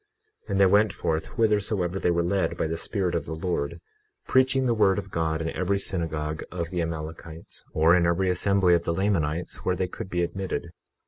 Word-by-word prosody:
21:16 - - -23
And 100 - +1
they 100 - +7
went 100 +1 +4
forth 80 -3 -1
whithersoever 105 -5 0
they - - +1
were 85 0 +2
led 95 +2 0
by - - 0
the 80 +1 -2
Spirit 90 +1 -1
of 85 - -2
the 80 - -4
Lord, 85 -1 -2 0.5
preaching 130 0 +3
the 120 - +3
word 105 -3 +3
of 100 -2 -5
God 80 -1 -1
in 80 - -2
every 95 +2 0
synagogue 80 -5 -2
of 85 -2 -4
the 90 -2 -1
Amalekites, 80 0 -6
or 80 +2 +5
in 85 -1 +3
every 90 +2 +2
assembly 95 0 +3
of 85 -1 +3
the 85 - -1
Lamanites 85 -4 0
where 90 - -1
they 95 0 -1
could 90 - -7
be 90 -1 0
admitted. 90 -1 -3
90 Hz, 205 wpm, -26 LUFS, 80-100 Hz, 0.5 s, they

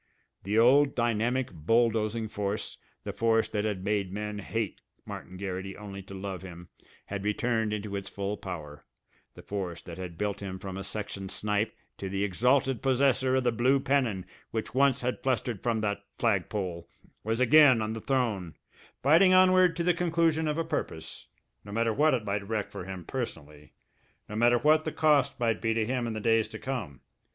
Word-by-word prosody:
The 105 +3 -1
old, 135 +5 +5
dynamic, 120 +2 0
bulldozing 110 +5 +1
force, 105 0 -3 0.3
the - - -5
force 115 -1 +2
that 105 0 -1
had 100 -4 -2
made 100 -2 0
men 105 +1 -4
hate 110 +1 -3 0.2
Martin 95 - -8
Garrity 95 0 -5
only 100 -2 -8
to 95 +1 -10
love 95 -1 -5
him, 90 -2 -10 0.4
had 100 -1 -5
returned 110 +1 0
into 105 -1 -3
its 100 0 -4
full 100 +1 -3
power, 75 -7 -8 0.5
the - - -12
force 95 -5 -4
that 85 0 -9
had 90 -3 -6
built 105 +1 -2
him 95 -2 -5
from 95 0 -7
a 95 - -5
section 100 -2 -5
snipe 105 +2 -1 0.2
to 95 - -4
the 100 +1 -1
exalted 125 +6 +2
possessor 130 -1 +2
of 130 - +2
the 120 - +2
blue 125 +4 +3
pennon 130 -9 0 0.2
which 110 -1 -4
once 135 0 +3
had 125 0 -2
fluttered 125 -5 -1
from 115 -2 0
that 100 -1 -2
flagpole, 95 -5 -1 0.3
was 115 +2 -1
again 130 -1 +7
on 110 0 -2
the 115 - -5
throne, 110 - -1 0.5
fighting 175 +7 +6
onward 185 -1 +5
to 170 - -1
the 180 +1 +3
conclusion 165 -2 +1
of 150 0 -1
a 165 - 0
purpose, 80 0 -5 0.4
no 100 - -10
matter 115 +1 +1
what 150 +3 +4
it 115 -4 -4
might 100 0 -2
wreck 110 -2 -2
for 90 - -7
him 95 -3 -7
personally, 75 0 -6 0.5
no 105 - -7
matter 120 +2 +4
what 155 +5 +4
the 155 - -2
cost 145 -4 +2
might 115 -3 +1
be 115 0 +1
to 110 -1 +1
him 125 0 -1
in 115 - -3
the 110 - -3
days 115 0 +2
to 110 0 -8
come. 110 - -5
110 Hz, 185 wpm, -29 LUFS, 100-130 Hz, 0.5 s, again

